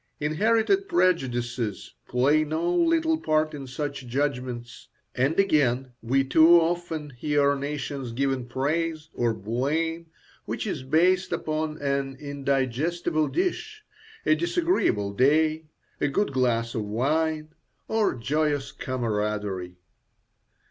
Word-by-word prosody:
Inherited 225 - +2
prejudices 125 - 0
play 140 +5 +3
no 160 +3 -1
little 325 - +2
part 155 - +1
in 140 -2 -7
such 140 0 -5
judgments; 125 -2 -3 0.3
and, 135 +8 +1
again, 135 -9 +2
we 135 +4 +2
too 160 +5 +6
often 165 -3 -2
hear 140 +2 +1
nations 140 -2 -4
given 130 0 -1
praise 155 +5 -2
or 120 -1 +1
blame 145 - -2 0.4
which - - -3
is - - -3
based 180 +7 +2
upon 155 -2 -2
an 140 -1 -1
indigestible 145 +3 -1
dish, 425 +4 -2 0.4
a - - +5
disagreeable 330 - +1
day, 155 +6 +2 0.3
a - - +1
good 145 +2 0
glass 115 -3 +1
of 110 - -2
wine, 155 +8 0 0.4
or 220 -8 +1
joyous 145 +3 -1
camaraderie. 105 -7 -3
145 Hz, 110 wpm, -26 LUFS, 125-165 Hz, 0.4 s, too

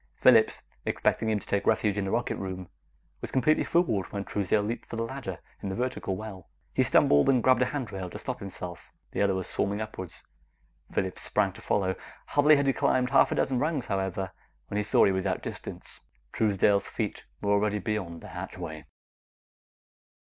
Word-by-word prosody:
Phillips, - - +5 0.2
expecting 110 - +1
him 110 - +2
to - - -14
take 100 - -1
refuge 105 -2 +3
in 100 -1 -1
the 95 - -2
rocket 120 +1 0
room, 95 -2 -5 0.5
was - - -4
completely 135 +4 +3
fooled 120 - +1
when 100 -1 -4
Truesdale 105 +1 +1
leaped 115 +3 -4
for - - -6
the 115 - -1
ladder 115 -7 -5 0.2
in 100 - -3
the 95 - -3
vertical 125 -5 -2
well. 95 -4 -8 0.2
He - - +2
stumbled, 70 - +5
and 125 -4 +4
grabbed 130 -1 +5
a - - +5
handrail 115 -10 -4
to - - -7
stop - - -4
himself. 90 -3 -8 0.2
The - - -1
other 100 -2 +3
was 95 -1 -2
swarming 100 +1 -1
upward. 100 -5 -5 0.8
Phillips 95 -1 -2
sprang - - +1
to - - -12
follow. 95 -2 +1 0.4
Hardly 150 +1 +6
had 140 -1 +2
he 135 - +3
climbed 125 0 +2
half 135 - +5
a - - +1
dozen 130 -2 +1
rungs, 150 -3 0
however, 95 -1 -2 0.4
than 100 - -2
he - - +1
saw 105 - +5
he 100 - +4
was 95 -1 0
outdistanced. - - -5 0.3
Truesdale's 100 -1 +2
feet - - -3
were 100 - 0
already 105 +1 +2
disappearing 105 -1 -2
beyond 85 -1 -9
the - - -10
hatchway. 80 0 -6
105 Hz, 190 wpm, -28 LUFS, 95-120 Hz, 0.8 s, Hardly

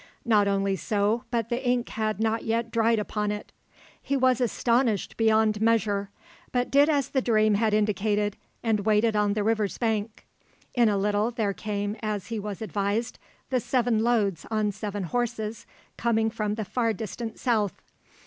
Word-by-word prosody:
Not 210 -4 +4
only 195 0 +1
so, 210 +3 0
but 230 -2 -1
the 245 +2 -2
ink 245 -1 +1
had 215 -2 -2
not 225 0 0
yet 230 +1 -1
dried 230 0 +3
upon 210 0 -1
it. 210 0 -6 0.5
He 280 - -1
was 255 -1 +3
astonished 235 -2 +1
beyond 220 -1 +2
measure, 210 -3 +1 0.4
but 245 0 0
did 285 +2 +5
as 285 -3 +1
the 265 - +1
dream 215 -3 +3
had 215 +1 +2
indicated, 210 0 +1 0.3
and 220 -2 +2
waited 215 +2 +2
on 210 -1 +2
the 210 0 -1
river's 215 -2 0
bank. 220 -2 -2 0.5
In 240 -3 +4
a 205 - +1
little 205 +2 +1
there 220 -4 -1
came, 205 0 -3
as 210 -2 -3
he 225 -2 -2
was 205 0 -5
advised, 210 +2 -2 0.3
the 255 - +2
seven 240 -1 +1
loads 215 -7 +1
on 215 -2 0
seven 205 -1 -4
horses, 225 +1 -3 0.3
coming 225 -1 +1
from 215 -2 -2
the 215 -1 -4
far 230 +1 0
distant 225 +2 -6
South. 220 -6 0
220 Hz, 170 wpm, -26 LUFS, 210-230 Hz, 0.5 s, did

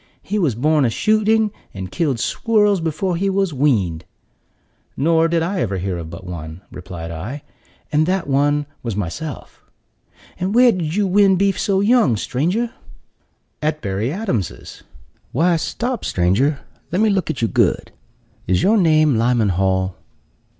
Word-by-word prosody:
He 210 +2 -2
was 150 - +1
born 150 +4 +2
a 120 - +3
shooting, 215 - +2 0.2
and 95 -1 -6
killed 140 -8 -1
squirrels 210 - +2
before 165 +3 -1
he 195 +3 0
was 195 -3 0
weaned." 105 - +1 0.9
"Nor 165 +3 +3
did 165 0 +1
I 185 +3 -2
ever 100 -4 -1
hear 90 -1 -3
of 80 -1 -7
but 85 +3 -9
one," 85 -1 -7
replied 85 -2 -8
I, 110 - -6 0.5
"and 155 +1 +2
that 185 -1 0
one 145 +1 +1 0.2
was 115 -5 -4
myself." 110 - -6 0.8
"And 190 +4 -1
where 245 0 +7
did 170 -5 -3
you 205 0 +2
win 195 0 +4
beef 195 +1 +1
so 195 -1 +1
young, 205 - +3
stranger?" 180 - -1 0.9
"At 155 0 -1
Berry 100 +5 -1
Adams's." 150 - -4 0.5
"Why, 170 +6 +3
stop, 240 +8 -3
stranger, 110 - +1 0.3
let 180 - 0
me 220 -1 +3
look 190 -5 0
at 155 - -2
you - - +3
good! - - +1 0.6
Is 90 0 +2
your 220 +3 +4
name 155 - +3
Lyman 115 -2 +2
Hall?" 95 0 0
155 Hz, 155 wpm, -20 LUFS, -, 0.9 s, where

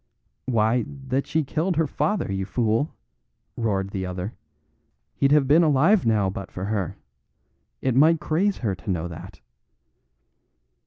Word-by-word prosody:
"Why, 115 0 +2
that 135 -1 -3
she 160 -1 +1
killed 165 +6 -1
her 160 +1 +2
father, 150 - -1
you 95 0 -2
fool!" 115 +6 0 0.7
roared 100 -4 -1
the 95 -1 -3
other. 90 +4 -4 0.8
"He'd 140 - +1
have 145 -2 +4
been 155 +5 +6
alive 160 - +4
now 105 -3 +3
but 95 0 -5
for 95 - -5
her. 100 -3 -2 0.9
It 130 - +2
might 155 +5 +5
craze 185 +7 0
her 100 - +1
to 85 +1 -9
know 90 -2 -1
that." 85 -2 -10
120 Hz, 145 wpm, -24 LUFS, 95-150 Hz, 0.9 s, been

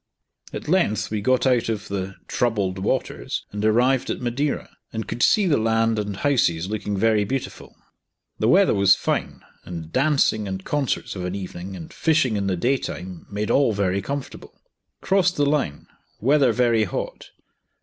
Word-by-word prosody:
At - - -7
length 160 - +1
we 105 -1 -1
got 130 +4 +2
out 125 -3 +2
of 105 -2 -3
the 100 -1 -4
"troubled 100 -6 0
waters," 95 - -2
and 105 0 -4
arrived 120 +4 +3
at - - -2
Madeira, 130 +4 -2 0.2
and 110 -1 -4
could 120 - -4
see 210 - +4
the 155 -8 +3
land 115 0 +2
and 100 -2 -3
houses 95 -12 +1
looking 105 -1 -3
very 110 0 +3
beautiful. 130 +6 -5 0.6
The 110 - +2
weather 190 +9 +5
was 100 -1 +5
fine, - - -2 0.2
and 80 -2 -8
dancing 135 -7 +2
and 95 0 -5
concerts 145 -7 -1
of 90 - -5
an 90 +1 -3
evening, 95 -1 -6
and 85 -3 -9
fishing 155 -8 +2
in 100 -1 -1
the 95 -2 0
day 130 +10 +2
time, 90 -7 -7
made 105 +1 -2
all 135 -5 +3
very 100 -1 0
comfortable. 140 +6 -7 0.4
Crossed 190 -2 +2
the 145 - +2
line; 140 - -1 0.3
weather 135 +1 +4
very 115 -2 +2
hot. 90 - -5
110 Hz, 170 wpm, -23 LUFS, 100-135 Hz, 0.6 s, weather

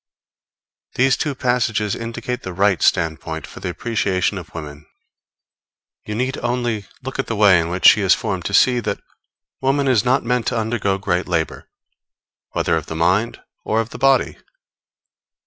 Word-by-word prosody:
These 135 +1 +3
two 145 -3 -2
passages 120 -5 0
indicate 115 +2 -5
the 95 - -6
right 95 0 +2
standpoint 80 -2 0
for - - -12
the - - -4
appreciation 100 -4 -1
of 85 - -12
women. 75 -2 -9 1.2
You 105 - -4
need 130 +3 -2
only 120 -4 -2 0.2
look 130 +1 -6
at 135 - -1
the 115 - -2
way 100 -4 +6
in 85 0 -2
which 90 0 -3
she 105 - +7
is 95 -2 +4
formed, 95 -4 -4
to 100 - -3
see 125 +2 +4
that 120 - -3 0.6
woman 135 +1 +1
is 125 -6 +3
not 130 +3 +2
meant 125 0 -1
to 125 - 0
undergo 110 -3 0
great 90 -2 -1
labor, 80 -3 -2 0.8
whether - - +1
of 80 - -5
the 80 - -5
mind 95 +8 +1 0.2
or 110 - 0
of 115 0 -2
the - - -8
body. 135 0 +3
105 Hz, 165 wpm, -20 LUFS, 90-125 Hz, 1.2 s, she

